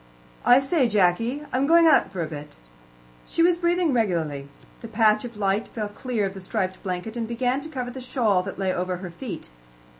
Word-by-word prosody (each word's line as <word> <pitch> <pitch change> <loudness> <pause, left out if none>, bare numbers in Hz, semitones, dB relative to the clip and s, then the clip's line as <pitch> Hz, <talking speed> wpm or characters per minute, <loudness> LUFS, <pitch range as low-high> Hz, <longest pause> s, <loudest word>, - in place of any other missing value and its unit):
"I 245 +1 +7
say, 270 -2 +1
Jacky, 220 +8 +1
I'm 265 +2 +1
going 335 +1 +6
out 310 -11 +4
for 185 -3 -3
a - - -4
bit." 150 -1 -9 0.7
She 330 - +1
was 350 0 +5
breathing 345 -2 +1
regularly. 160 - -1 0.3
The 230 - -8
patch 215 -1 +3
of 235 -3 -9
light 200 +2 0
fell 210 -2 -4
clear 220 0 -2
of 190 - -3
the 195 - -9
striped 185 -1 -3
blanket, 185 +4 -4
and 230 -2 -3
began 245 +3 -1
to 315 - -8
cover 250 -5 -4
the 260 +1 -8
shawl 225 -7 +1
that 195 +1 -7
lay 190 -1 0
over 180 0 -2
her 180 -1 -7
feet. 195 - -7
220 Hz, 205 wpm, -24 LUFS, 185-255 Hz, 0.7 s, I